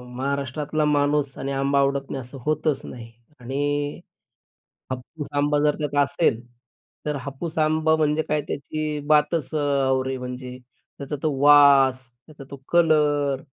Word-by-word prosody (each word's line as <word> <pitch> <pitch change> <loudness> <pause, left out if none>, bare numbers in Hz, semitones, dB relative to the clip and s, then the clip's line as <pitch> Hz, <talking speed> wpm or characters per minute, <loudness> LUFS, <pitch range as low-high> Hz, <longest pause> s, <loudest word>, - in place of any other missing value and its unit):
महाराष्ट्रातला 140 +3 -2
माणूस 145 -1 +1
आणि 135 +1 -4
आंबा 140 +1 +1
आवडत 140 0 0
नाही 135 - -4
असं 130 +3 -11
होतच 155 -2 0
नाही 115 -2 -10 0.3
आणि 145 +3 -2 1.0
अ, 130 - 0
हापूस 145 +4 -9
आंबा 145 +1 +2
जर 150 - +3
त्यात 150 -1 -3
असेल, 140 -5 0 0.7
तर 150 -1 -1
हापूस 145 +5 -6
आंबा 155 0 +2
म्हणजे 155 0 +1
काय 150 0 +1
त्याची 150 +1 -3
बातच 150 -1 +2
अ, - - +1 0.3
और 130 0 0
म्हणजे. 125 0 -7 0.4
त्याचा 140 +1 -5
तो 155 - +1
वास, 140 -2 +6 0.3
त्याचा 150 -3 -12
तो 140 - -7 0.2
कलर 150 -5 +2
145 Hz, 140 wpm, -23 LUFS, 135-150 Hz, 1.0 s, वास